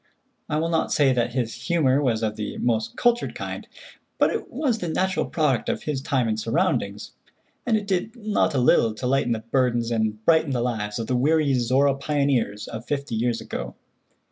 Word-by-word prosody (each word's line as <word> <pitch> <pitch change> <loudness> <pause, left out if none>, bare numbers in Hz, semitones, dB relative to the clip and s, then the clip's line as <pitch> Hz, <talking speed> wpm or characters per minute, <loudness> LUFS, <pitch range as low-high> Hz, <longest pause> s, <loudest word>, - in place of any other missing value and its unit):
I 150 - 0
will 165 +2 0
not 165 -1 0
say 140 -3 +4
that 120 -1 0
his 120 -3 -1
humor 145 -6 +1
was 115 -5 0
of 105 -1 -1
the 105 -1 -5
most 115 -1 -1
cultured 240 0 +1
kind, - - -6 0.5
but - - +3
it - - -4
was 250 -7 0
the 175 - -3
natural 185 +3 0
product 150 -7 0
of - - -2
his 145 -3 -2
time 130 -3 0
and 110 0 -1
surroundings, 160 - -1 0.6
and 225 -2 +3
it 210 - -4
did 200 +4 -1
not 215 - 0
a - - +2
little 115 -3 +3
to 125 - -5
lighten 130 -1 +1
the 110 - -4
burdens 120 -3 +1
and 110 -1 -1
brighten 160 -4 +3
the 120 - 0
lives 105 -4 -2
of 115 - -3
the 125 - -1
weary 145 +2 +2
Zorra 130 +3 +3
pioneers 135 -7 0
of 115 +1 -7
fifty 140 -4 -3
years 115 +1 0
ago. - - -6
130 Hz, 195 wpm, -24 LUFS, 115-155 Hz, 0.6 s, say